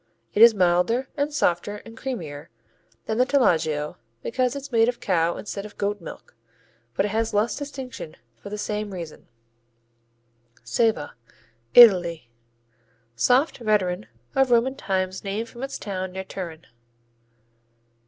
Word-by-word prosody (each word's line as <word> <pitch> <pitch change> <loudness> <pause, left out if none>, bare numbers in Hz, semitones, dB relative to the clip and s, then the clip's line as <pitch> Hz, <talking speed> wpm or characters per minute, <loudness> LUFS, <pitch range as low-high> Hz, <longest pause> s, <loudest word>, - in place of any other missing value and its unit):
It 210 - +2
is 230 -1 +9
milder 185 +8 +2
and 290 0 -1
softer 205 - 0
and 225 - -11
creamier 165 - -6 0.6
than 220 +1 -2
the - - +7
Taleggio 160 - +1 0.3
because 255 +1 0
it's 280 0 -7
made 230 0 +4
of 245 - -4
cow 170 -3 +1
instead 200 -1 -5
of 210 0 -11
goat 205 -1 -1
milk, 165 - -10 0.6
but 195 - +2
it - - -1
has 220 +1 -1
less 215 +3 +2
distinction 265 - -7 0.2
for 120 - -11
the 210 - -5
same 210 -1 -3
reason. 170 -3 -8 1.4
Ceva 185 - +1 0.6
Italy 175 - +7 0.8
Soft 255 - +2
veteran 190 - 0 0.3
of 270 -1 +3
Roman 240 +2 +3
times 190 -4 -2
named 210 +3 -3
from 240 - -11
its 270 0 -4
town 190 -2 -4
near 190 0 -4
Turin. 170 -4 -7
210 Hz, 135 wpm, -24 LUFS, 180-240 Hz, 1.4 s, is